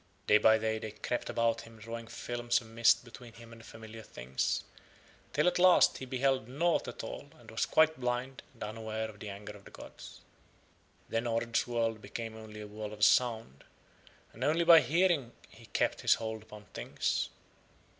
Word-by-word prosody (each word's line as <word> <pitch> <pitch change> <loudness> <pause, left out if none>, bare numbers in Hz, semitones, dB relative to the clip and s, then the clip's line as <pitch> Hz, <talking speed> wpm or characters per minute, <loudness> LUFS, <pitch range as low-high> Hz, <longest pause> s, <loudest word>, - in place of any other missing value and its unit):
Day 105 - +6
by 110 +1 +6
day 110 0 -1
They 110 - -5
crept 110 +3 -4
about 115 -1 +1
him 115 0 -14
drawing 115 +1 -7
films 120 0 -1
of 120 - -13
mist 115 +2 +3
between 120 -1 -12
him 115 0 -13
and 115 -1 -13
familiar 110 0 -10
things, 65 - -2 0.7
till 150 - +1
at 180 - +2
last 180 0 +6
he 130 - -6
beheld 130 -1 0
nought 165 +7 +1
at - - -6
all - - -7
and - - -14
was - - 0
quite 160 -2 +4
blind 125 +1 -2
and - - -8
unaware 110 +1 -4
of 105 -1 -13
the 105 - -6
anger 100 +1 -8
of 100 -1 -14
the - - -13
gods. - - -12 0.9
Then 115 +1 -1
Ord's 115 +1 0
world 115 -2 -1
became 115 -1 -6
only 110 -1 -9
a 105 - -7
world 105 0 -7
of 105 0 +3
sound, 115 - +2 0.7
and 120 - -6
only 160 +4 +2
by 165 -1 +10
hearing 165 -6 +2 0.2
he - - -16
kept - - 0
his - - +5
hold 110 -1 -5
upon 105 -1 -13
Things. - - -1
115 Hz, 185 wpm, -32 LUFS, 110-125 Hz, 0.9 s, by